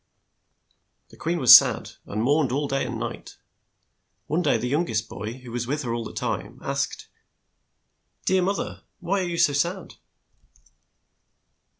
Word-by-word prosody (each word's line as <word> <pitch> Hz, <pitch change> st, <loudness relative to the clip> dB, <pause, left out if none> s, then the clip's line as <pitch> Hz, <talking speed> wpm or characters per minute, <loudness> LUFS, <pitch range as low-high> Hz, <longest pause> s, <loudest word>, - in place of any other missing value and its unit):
The -, -, -16 dB
queen 170 Hz, +2 st, -2 dB
was 130 Hz, -7 st, +10 dB
sad, -, -, +4 dB, 0.2 s
and 105 Hz, +2 st, -2 dB
mourned 145 Hz, +1 st, +2 dB, 0.2 s
day 135 Hz, -2 st, 0 dB
and 120 Hz, -2 st, -4 dB
night. 120 Hz, 0 st, -7 dB, 0.9 s
One 155 Hz, +4 st, 0 dB
day 150 Hz, -5 st, +2 dB
the 125 Hz, -, -3 dB
young 150 Hz, +7 st, 0 dB
est 110 Hz, 0 st, -1 dB
boy, 110 Hz, +2 st, -6 dB
who 125 Hz, -2 st, -11 dB
was 120 Hz, 0 st, -3 dB
with 145 Hz, +3 st, -2 dB
her 120 Hz, -2 st, -3 dB
all 120 Hz, -1 st, -3 dB
the -, -, -7 dB
time, -, -, -4 dB
asked. -, -, -3 dB, 1.2 s
"Dear 190 Hz, 0 st, +3 dB
moth 195 Hz, +2 st, 0 dB
er, -, -, -6 dB, 0.2 s
why 195 Hz, +3 st, -1 dB
are 180 Hz, -2 st, -2 dB
you 170 Hz, -, -3 dB
so 145 Hz, -, +3 dB
sad?" 170 Hz, +7 st, -2 dB
140 Hz, 160 wpm, -24 LUFS, 120-170 Hz, 1.2 s, was